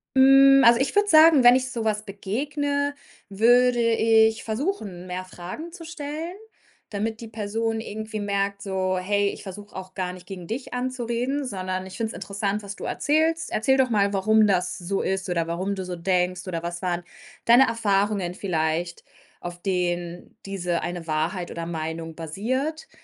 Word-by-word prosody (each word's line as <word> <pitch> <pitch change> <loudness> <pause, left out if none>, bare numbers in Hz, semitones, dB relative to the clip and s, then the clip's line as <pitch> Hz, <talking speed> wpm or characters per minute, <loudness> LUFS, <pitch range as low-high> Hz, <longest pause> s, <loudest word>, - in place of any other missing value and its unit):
Hm, 270 +1 +7
also 235 0 +7
ich 270 - 0
würde 410 0 +4
sagen, 315 -5 +7
wenn 245 +1 +9
ich 255 0 -1
so 230 -2 -3
was 215 0 0
begegne, 285 +8 -2 0.4
würde 240 +4 +4
ich 225 -1 +3
versuchen, 215 - -3
mehr 180 +1 -4
Fragen 185 - -8
zu 335 -2 -10
stellen, 320 +2 -6 0.5
damit 220 +2 -3
die 225 - -8
Person 225 +1 -2
irgendwie 215 0 -5
merkt 200 0 -1
so: 185 -1 -1
„Hey, 200 +2 +1
ich - - -8
versuche 205 +1 -9
auch 185 0 -8
gar 180 -2 -3
nicht 180 -1 -12
gegen 180 -3 -8
dich 250 +3 -5
anzureden, 250 +2 -2
sondern 185 -4 -4
ich 190 - -10
finde 225 -2 -2
es - - -8
interessant, 200 +1 -3
was 200 0 -7
du - - -10
erzählst. 320 +2 0
Erzähl 265 +5 +2
doch 260 -1 +3
mal, 200 -2 +2
warum 215 +2 +4
das 180 -2 0
so 190 +2 -2
ist 190 0 -2
oder 170 -2 0
warum 185 +4 -2
du 190 -1 -5
so 180 -1 -5
denkst 180 +1 0
oder 170 -3 -3
was 175 +1 -5
waren 175 -1 -2 0.4
deine 245 +3 +7
Erfahrungen 200 -4 0
vielleicht, 170 -2 -2 0.3
auf 175 0 -8
denen 175 -2 -2
diese 180 -3 -2
eine 175 -1 -5
Wahrheit 160 +4 -2
oder 165 0 -5
Meinung 160 -1 -5
basiert.“ 260 - -3
205 Hz, 170 wpm, -24 LUFS, 180-245 Hz, 0.5 s, wenn